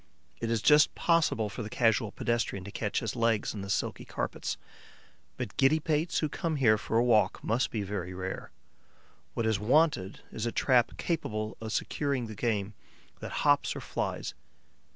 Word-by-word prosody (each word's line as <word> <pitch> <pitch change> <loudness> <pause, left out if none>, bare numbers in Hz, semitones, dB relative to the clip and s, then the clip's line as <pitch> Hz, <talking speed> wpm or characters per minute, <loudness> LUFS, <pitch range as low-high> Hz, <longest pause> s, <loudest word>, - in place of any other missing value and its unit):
It 115 - -2
is 115 -2 0
just 150 0 +6
possible 165 -10 +2
for 105 - -6
the 110 - -5
casual 110 -2 +2
pedestrian 115 -5 -1
to 100 - -8
catch 105 0 -1
his 115 -2 -3
legs 115 -3 +1
in 105 - -5
the 100 - -6
silky - - -1
carpets; - - -3 0.8
but - - -5
giddy 140 +4 +4
pates 155 +2 0
who 155 - +1
come 160 +2 -2
here 110 -7 +4
for 110 - -1
a 120 - +4
walk 115 -4 +3
must 115 +3 +1
be 110 -3 -2
very 95 -3 -4
rare. 95 +1 -5 0.9
What 115 - 0
is 110 -3 +2
wanted 120 - +2
is 110 +1 -3
a - - -1
trap 125 -2 +2
capable 110 -10 -2
of 110 -1 -5
securing 140 0 -1
the 110 - -7
game 105 -2 -1 0.5
that - - -6
hops - - +3
or - - -4
flies. - - -3
115 Hz, 175 wpm, -30 LUFS, 105-135 Hz, 0.9 s, just